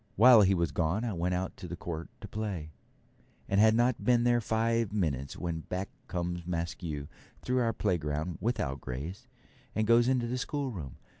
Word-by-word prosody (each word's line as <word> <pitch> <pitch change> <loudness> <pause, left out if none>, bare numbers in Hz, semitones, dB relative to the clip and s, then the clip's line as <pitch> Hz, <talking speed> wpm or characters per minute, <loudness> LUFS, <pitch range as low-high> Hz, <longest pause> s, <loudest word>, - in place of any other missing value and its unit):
While 120 0 +8
he 95 -1 +4
was 85 -4 0
gone 85 - 0
I 115 - -1
went 90 +1 0
out 90 +1 -3
to 90 - -7
the 85 - -5
court 85 -1 -5
to - - -7
play, 95 -8 -4 0.8
and 100 +1 +3
had 110 0 +6
not 120 +1 +2
been 120 -1 +4
there 120 0 +3
five 115 0 +1
minutes 75 -10 -1
when 85 -2 -3
back 90 +4 -4 0.2
comes 85 -1 -3
Maskew 85 -4 -3 0.4
through 125 0 +1
our 115 -2 +2
playground 85 -5 -1
without 75 - -1
Grace, 80 - -6 0.5
and 110 - +2
goes 115 +2 +5
into 130 -2 +2
the 125 +2 -2
schoolroom. 125 - -4
95 Hz, 175 wpm, -30 LUFS, 85-115 Hz, 0.8 s, While